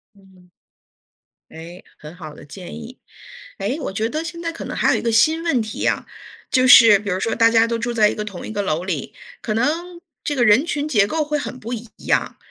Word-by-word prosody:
嗯。 190 -2 -22 1.0
哎， 170 +3 -11
很 150 +3 -12
好 155 -4 -10
的 - - -14
建 175 +5 -10
议。 235 +2 -10 0.6
哎， 210 +8 -2
我 275 - -4
觉 220 +2 -1
得 310 +5 -3
现 335 0 -7
在 335 -1 -3
可 330 - -8
能 - - -6
还 - - +2
有 - - +1
一 - - -6
个 230 - -1
新 315 +8 +3
问 275 -9 +1
题 215 0 -7
呀。 - - 0 0.5
就 255 -1 +3
是 225 -5 +8
比 205 - -6
如 185 0 -1
说 225 - -1
大 230 0 +4
家 225 0 +4
都 230 0 -2
住 235 +1 -3
在 210 -2 +4
一 - - -3
个 210 - -4
同 200 -4 -8
一 - - -7
个 205 -1 -2
楼 165 -3 -2
里， 185 - -4 0.3
可 215 -2 -3
能 340 +8 -2 0.2
这 295 -2 -2
个 245 - +2
人 215 +5 +5
群 300 -3 -2
结 210 -8 +2
构 315 +6 -1
会 300 0 -2
很 255 - -7
不 235 +2 -6
一 230 -1 -7 0.2
样， - - 0
230 Hz, 255 characters per minute, -20 LUFS, 200-280 Hz, 1.0 s, 是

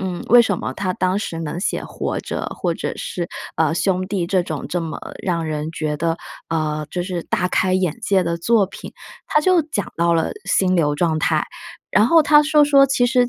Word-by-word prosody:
嗯， 185 -2 -4
为 240 0 +9
什 235 - +1
么 - - -4
他 185 -2 -2
当 185 +2 0
时 170 -5 -4
能 165 +2 -4
写 - - -1
《活 - - -4
着》， - - -4
或 - - 0
者 - - -4
是， 175 -1 -4 0.3
呃， 160 0 +3
《兄 185 0 0
弟》 190 -4 -2
这 185 -2 +3
种 155 -4 -5
这 175 - -1
么 160 -1 -5 0.2
让 170 -3 -1
人 155 0 -3
觉 155 -2 -3
得， 165 0 0 0.3
呃， 155 -2 -2
就 180 - -2
是 175 -2 -4
大 200 -6 0
开 185 0 +1
眼 185 0 0
界 200 -4 +2
的 170 0 -2
作 210 +4 +3
品。 - - -10 0.4
他 - - +2
就 365 +1 +4
讲 285 - -3
到 170 0 +2
了 165 - +1 0.2
心 185 -1 +2
流 150 -4 +2
状 160 0 +1
态， 155 0 +1 0.5
然 210 +3 +4
后 325 +3 +6
他 300 0 +6
说 300 -1 +4
说： 275 -1 +5
“其 245 -2 +2
实 250 -1 +2
185 Hz, 230 characters per minute, -20 LUFS, 165-225 Hz, 0.5 s, 为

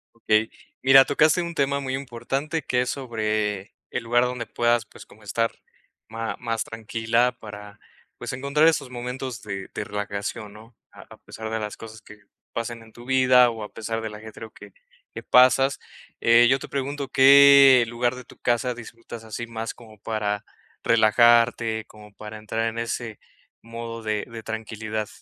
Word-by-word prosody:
Okey. 110 -1 +1 0.3
Mira, 135 +1 +8
tocaste 155 +5 +3
un 170 -1 -5
tema 140 0 0
muy 130 -1 -4
importante, 135 +4 -3
que 125 - -1
es 125 - -2
sobre 110 -5 -2 0.2
el 125 - -4
lugar 120 +1 +2
donde 125 -1 -3
puedas, 120 -1 +1
pues, - - -15
como 110 - -19
estar 115 +3 -1 0.6
ma 115 +1 -5
más 115 -2 -2
tranquila 115 +2 -1
para, 105 -1 -11 0.4
pues, - - -6
encontrar 140 +4 +1
esos 145 -5 -2
momentos 125 0 -6
de 100 -2 -6
de - - -3
relajación 105 +1 -5
¿no?, 110 +3 -15 0.2
a - - -14
a - - -15
pesar 110 0 -8
de 110 0 -2
las 105 -1 -5
cosas 110 -1 -11
que 105 - -14 0.4
pasen 115 0 -4
en 110 -1 -17
tu 120 - -13
vida 130 -1 +5
o 115 -2 -7
a 105 - -10
pesar 115 +1 -4
de 110 - -4
el 105 - -8
ajetreo 110 +1 -10
que - - -14 0.4
que - - -7
pasas. 130 +2 +4 0.4
Eh, 115 +1 +6
yo 135 +1 +3
te - - -9
pregunto, 140 0 -4
¿qué 140 -1 +8
lugar 120 +1 -1
de 125 - -9
tu - - -18
casa 120 +1 0
disfrutas 115 -1 -11
así 115 +2 -6
más 115 -1 -5
como 110 -2 -16
para 105 -2 -3 0.4
relajarte, 115 0 +3
como 105 -1 -16
para 105 +1 -9
entrar 110 +1 -3
en 115 +1 -6
ese 115 -2 -4 0.4
modo 115 0 -7
de 110 -1 -2
de 115 -1 -8
tranquilidad? 110 -1 -5
115 Hz, 175 wpm, -24 LUFS, 110-125 Hz, 0.6 s, Mira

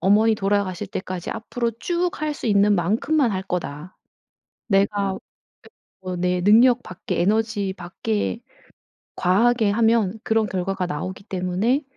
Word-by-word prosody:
어머니 210 +5 +4
돌아가실 195 -2 -1
때까지 185 -2 -5
앞으로 235 +1 -3
쭉 350 0 0
할 305 0 0
수 250 - -6
있는 205 -1 +4
만큼만 230 - +1
할 190 0 -2
거다. 175 -3 -5 0.7
내가 200 -1 +1 0.9
결국은 180 -1 -4
내 180 0 +1
능력 235 +5 +5
밖에 180 - -5
에너지 210 0 0
밖에 105 - -3 0.8
과하게 220 +4 +3
하면 220 -1 +2
그런 220 0 +2
결과가 190 -1 -2
나오기 185 +4 -5
때문에 190 +9 0
200 Hz, 275 characters per minute, -23 LUFS, 185-225 Hz, 0.9 s, 능력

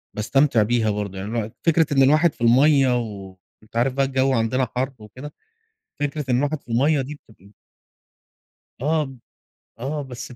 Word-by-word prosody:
باستمتع 120 +2 +2
بيها 110 0 +1
برضو. 100 -2 -3
يعني 95 +2 -5
الواحد 110 -1 -3
فكرة 165 -2 +3
إن 135 - +4
الواحد 155 +4 +4
في - - -24
المَيّة، 130 +2 +4
وأنت 100 -1 -11
عارف 125 +3 +1
بقى 135 +1 +1
الجو 135 0 +1
عندنا 125 +2 0
حَر 130 +2 -1
وكده، 125 +8 -11 0.7
فكرة 145 0 -2
إن 125 - +3
الواحد 145 +2 -1
في - - -36
المَيّة 140 +5 +2
دي 140 +3 -6
بتبقى 100 -2 -20 1.3
آه، 150 -1 0 0.7
آه 145 +5 -3
بس 125 -2 -9
130 Hz, 155 wpm, -22 LUFS, 110-145 Hz, 1.3 s, إن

